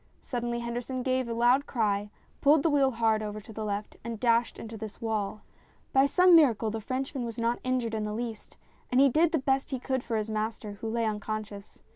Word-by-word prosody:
Suddenly 240 -1 -3
Henderson 245 +2 -4
gave 255 -1 0
a - - -1
loud 245 +4 +3
cry, 210 -4 0 0.3
pulled 290 0 +5
the 325 - +3
wheel 280 -2 +4
hard 225 -3 +1
over 210 0 -4
to 220 +2 -12
the 220 - -5
left, 205 0 -4
and 230 -1 -5
dashed 235 0 +2
into 225 0 -8
this 220 -1 -8
wall. 215 -2 -2 0.5
By 270 +1 +5
some 360 +4 +6
miracle 235 -9 +4
the 220 0 -4
Frenchman 265 +2 -3
was 230 -2 -5
not 235 +1 0
injured 255 -3 -1
in 215 -1 -1
the 210 - -3
least, 225 -1 -6 0.3
and 250 - +3
he 275 0 +7
did 315 +5 +3
the 325 - +2
best 270 -1 0
he 265 - -2
could 260 0 -2
for 230 - -2
his 215 0 -2
master, 215 0 -3
who 225 - -3
lay 230 0 0
unconscious. 210 -1 -5
235 Hz, 215 wpm, -28 LUFS, 215-260 Hz, 0.5 s, he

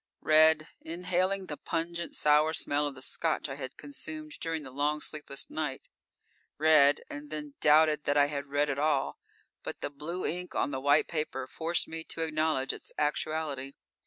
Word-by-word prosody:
Read, 155 0 +5
inhaling 180 +3 -1
the 150 - -5
pungent, 170 0 -3
sour 150 +1 +4
smell 145 -1 +1
of 140 - -6
the 130 - -9
Scotch 160 +1 -1
I - - -3
had 135 -2 -7
consumed 310 +2 -6
during 165 -2 -2
the 130 - -9
long, 145 +3 0
sleepless 150 -2 -5
night. 150 -4 -4 0.7
Read, 150 -2 +5
and 145 0 -8
then 150 -1 -5
doubted 150 0 +5
that 145 0 +2
I 145 - +6
had 145 -1 -4
read 145 +1 +1
at 135 - -3
all 145 -2 +1 0.4
but - - -6
the - - -3
blue 160 +6 -4
ink 180 +2 -3
on - - +1
the 130 -1 -3
white 145 +2 +4
paper 150 -5 -3
forced 165 +5 -1
me 160 0 -5
to 165 - -3
acknowledge 155 -4 0
its - - -10
actuality. 150 -2 -1
150 Hz, 175 wpm, -30 LUFS, 145-160 Hz, 0.7 s, I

